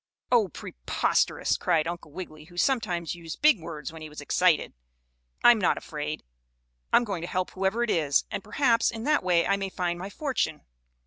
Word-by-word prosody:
"Oh, 235 -5 +5
preposterous!" - - 0
cried 160 -1 +1
Uncle 170 -3 -6
Wiggily, 155 -2 -8
who 175 +1 -16
sometimes 180 - 0
used 165 -2 -8
big 305 -9 +6
words 155 -3 -7
when 160 - -10
he 155 - -7
was 150 - -10
excited. 165 +3 +2 0.7
"I'm 240 -2 +7
not 185 - +2
afraid. 150 0 -5 0.7
I'm - - +5
going 195 -7 -3
to 170 - -4
help 185 0 -2
whoever 195 +5 0
it 235 - 0
is, 145 -4 +2
and, - - -4
perhaps, 230 +2 +2
in 225 -1 -5
that 300 -2 +2
way 175 -2 +3
I 200 - +2
may 195 -1 -3
find 175 -2 -2
my 190 +2 -5
fortune." 250 - -2
180 Hz, 185 wpm, -27 LUFS, 160-215 Hz, 0.7 s, I'm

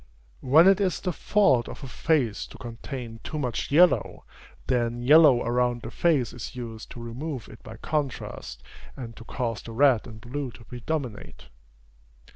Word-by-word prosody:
When 155 +7 +6
it 195 +1 +5
is 185 -3 0
the 180 - -2
fault 140 - +2
of - - -10
a - - -5
face 130 -5 0
to - - -13
contain 120 0 -7
too 155 - -5
much 125 -6 -2
yellow, 170 +5 +3 0.4
then 120 -2 0
yellow 145 -2 +7
around 120 0 0
the - - -6
face 150 -9 +1
is 125 +1 -8
used 115 -3 -7
to - - -10
remove 125 +2 -6
it 110 - -14
by 110 0 -10
contrast, 145 0 -4 0.3
and 115 -4 -7
to 115 - -11
cause 115 -2 -3
the 115 - -9
red 130 -2 +3
and 110 -2 -10
blue 130 +4 -5
to - - -14
predominate. 125 - -5
125 Hz, 165 wpm, -26 LUFS, 115-150 Hz, 0.4 s, yellow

